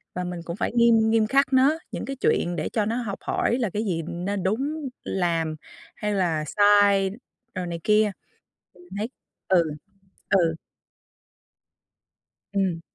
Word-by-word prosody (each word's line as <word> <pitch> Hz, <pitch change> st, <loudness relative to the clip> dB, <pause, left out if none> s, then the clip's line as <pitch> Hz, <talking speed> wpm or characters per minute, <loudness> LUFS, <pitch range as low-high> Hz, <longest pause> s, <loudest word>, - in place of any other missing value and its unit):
và 180 Hz, -, -2 dB
mình 180 Hz, -1 st, -5 dB
cũng 170 Hz, -, -4 dB
phải -, -, -2 dB
nghiêm 230 Hz, -2 st, +4 dB
nghiêm 225 Hz, -1 st, +3 dB
khắc 275 Hz, +2 st, +2 dB
nó 275 Hz, +5 st, +4 dB
những -, -, -4 dB
cái 275 Hz, -, -4 dB
chuyện 175 Hz, -8 st, +1 dB
để 160 Hz, -, -2 dB
cho 215 Hz, -3 st, 0 dB
nó 225 Hz, +2 st, -1 dB
học 215 Hz, -6 st, -4 dB
hỏi 240 Hz, -, 0 dB
là 230 Hz, -5 st, 0 dB
cái 210 Hz, +4 st, -2 dB
gì 170 Hz, -5 st, -1 dB
nên 185 Hz, +3 st, -3 dB
đúng 275 Hz, +9 st, -1 dB
làm 165 Hz, -4 st, -1 dB, 0.4 s
hay 210 Hz, -1 st, -2 dB
là 170 Hz, -6 st, 0 dB
sai 205 Hz, 0 st, +4 dB, 0.4 s
rồi 185 Hz, -1 st, -3 dB
này 170 Hz, -1 st, -4 dB
kia. 210 Hz, 0 st, +3 dB, 0.6 s
Thì 180 Hz, -, -18 dB
mình 175 Hz, -, -19 dB
thấy 215 Hz, +3 st, -2 dB, 0.4 s
ừ, 180 Hz, -3 st, +4 dB, 0.7 s
ừ. 170 Hz, -5 st, +3 dB, 2.0 s
Ừm. 190 Hz, -4 st, 0 dB
200 Hz, 160 wpm, -25 LUFS, 175-225 Hz, 2.0 s, nghiêm